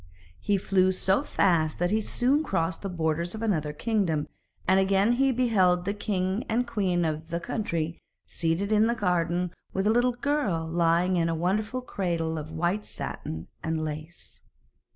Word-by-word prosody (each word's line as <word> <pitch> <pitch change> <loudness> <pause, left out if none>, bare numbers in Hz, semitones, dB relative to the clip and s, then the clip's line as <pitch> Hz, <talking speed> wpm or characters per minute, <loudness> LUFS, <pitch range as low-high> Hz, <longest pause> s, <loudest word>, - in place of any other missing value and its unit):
He 205 - +1
flew 185 -1 +2
so 190 +5 +2
fast 170 - +1
that 175 +1 0
he 220 +1 +2
soon 265 +7 +1
crossed 165 - -1
the 195 - -4
borders 170 +1 -1
of 220 - -5
another 155 -9 0
kingdom, 170 -3 0 0.4
and 190 +1 +5
again 195 +3 +3
he 270 +2 +3
beheld 190 -8 +2
the 200 - 0
king 195 0 -1
and 235 +2 +1
queen 185 -7 0
of 155 +1 -3
the 170 0 -2
country 170 -6 -3 0.3
seated 170 +5 -1
in 215 +1 +4
the 235 - +1
garden 180 -3 0 0.2
with 190 +1 0
a 215 - +4
little 245 +2 +3
girl 245 - -1
lying 170 +2 +2
in 165 -1 +1
a 165 - 0
wonderful 210 +9 -1
cradle 170 -8 -2
of 155 +1 -8
white 175 +6 -1
satin 80 +1 -6 0.2
and 160 -1 -1
lace. 155 +2 -7
185 Hz, 170 wpm, -27 LUFS, 165-215 Hz, 0.4 s, and